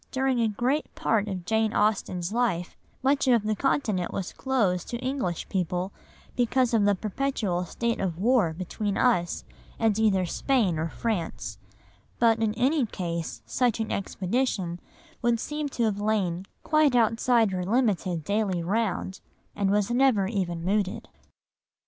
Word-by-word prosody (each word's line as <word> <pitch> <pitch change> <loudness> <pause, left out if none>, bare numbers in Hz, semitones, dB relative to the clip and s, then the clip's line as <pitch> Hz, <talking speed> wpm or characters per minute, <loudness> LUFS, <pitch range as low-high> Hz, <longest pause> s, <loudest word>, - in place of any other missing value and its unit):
During 265 -1 +1
a 225 - +3
great 250 +8 -1
part 215 -2 +1
of 185 -4 -4
Jane 220 +2 +1
Austen's 200 -3 0
life, 225 -8 0 0.3
much 275 +1 +2
of 235 -4 +4
the 215 0 0
Continent 215 -8 0
was 190 - -4
closed 215 -10 0
to 240 - -2
English 255 - -2
people 180 0 -1 0.4
because 250 0 +2
of 215 -3 +4
the 205 0 +4
perpetual 210 -4 -1
state 235 +6 -2
of 180 -4 -2
war 215 -3 +3
between 195 +4 -3
us 180 -9 +2 0.3
and 220 -2 +2
either 195 -4 +3
Spain 195 - +1
or 160 +1 -1
France, 165 - -3 0.6
but 230 -1 +4
in 215 -1 +1
any 260 +2 +2
case 170 -5 -4
such 245 -3 +1
an 220 - -2
expedition 190 -3 -1 0.4
would 235 -1 +2
seem 300 +3 -3
to 240 - -2
have 205 -2 0
lain 195 -4 0 0.2
quite 305 -4 +3
outside 230 -1 +3
her 180 -1 -2
limited 190 -6 +1
daily 200 -1 0
round, 195 -1 -1 0.3
and 200 -1 +1
was 205 +2 +1
never 245 -5 +3
even 180 -5 -2
mooted. 200 0 -1
215 Hz, 150 wpm, -27 LUFS, 185-240 Hz, 0.6 s, of